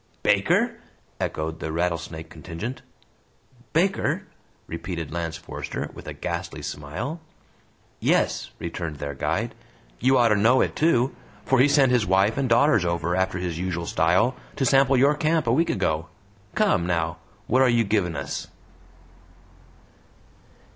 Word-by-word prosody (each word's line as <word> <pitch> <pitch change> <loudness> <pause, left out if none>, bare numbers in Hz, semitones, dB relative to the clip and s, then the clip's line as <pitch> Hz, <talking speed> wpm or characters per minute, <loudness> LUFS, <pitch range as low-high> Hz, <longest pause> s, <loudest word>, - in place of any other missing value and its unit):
"Baker?" - - +2 0.4
echoed 80 +1 -3
the 80 - -4
Rattlesnake 85 -1 -2
contingent. 85 +10 -6 0.9
"Baker?" 190 +5 +1 0.4
repeated 85 -1 -5
Lance 80 -1 -3
Forester, - - -6
with - - -11
a - - -4
ghastly - - -5
smile. 100 - -5 0.8
"Yes," - - +1
returned 85 -2 -5
their 70 0 -5
guide. 70 - -2 0.5
"You 130 +2 +4
oughter 115 -3 +4
know 115 +6 +4
it - - 0
too! 135 -5 +2 0.3
For 135 - +3
he 130 - +6
sent 140 -3 +4
his 120 -4 +2
wife 95 +4 +3
and 135 -2 0
daughters 115 -3 +4
over, 85 0 0
after 95 -1 0
his 90 -2 -3
usual 90 -2 -2
style, 90 +11 +2 0.2
to 135 - 0
sample 135 +1 +4
your 140 +3 +5
camp, 155 0 +1
a 115 - +2
week 165 +6 +2
ago! 80 +1 0 0.5
Come, 195 - +2
now, 85 -1 0 0.3
what 130 +5 +3
are 130 - +5
you 120 -1 +3
givin' 100 -6 0
us?" - - -4
95 Hz, 140 wpm, -25 LUFS, 85-130 Hz, 0.9 s, he